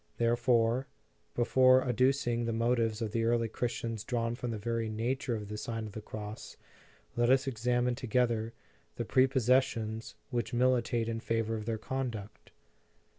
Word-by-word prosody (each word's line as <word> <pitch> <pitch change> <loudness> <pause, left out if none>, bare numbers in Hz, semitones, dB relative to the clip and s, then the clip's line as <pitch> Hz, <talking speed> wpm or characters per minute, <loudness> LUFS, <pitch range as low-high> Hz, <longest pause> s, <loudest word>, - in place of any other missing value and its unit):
Therefore, 120 +1 +2 0.5
before 130 +2 +5
adducing 125 -1 +1
the - - 0
motives 115 -1 +1
of 110 - -3
the 115 +1 0
early 115 0 +2
Christians 115 -1 -3
drawn 115 0 -1
from 120 0 -4
the 115 - -3
very 115 +1 -2
nature 120 +3 -1
of 105 -2 -5
the 105 +1 -5
Sign 115 -1 -4
of 105 - -7
the 110 - -7
Cross, 105 +1 -8 0.6
let 120 0 +2
us 130 +1 +4
examine 125 0 0
together 120 -2 0 0.4
the - - -3
prepossessions 130 -4 +2 0.2
which 120 0 -2
militate 120 -2 +2
in 115 0 -2
favor 115 0 -1
of 110 -1 -5
their 115 -1 -1
conduct. 115 -4 -5
115 Hz, 150 wpm, -31 LUFS, 115-125 Hz, 0.6 s, before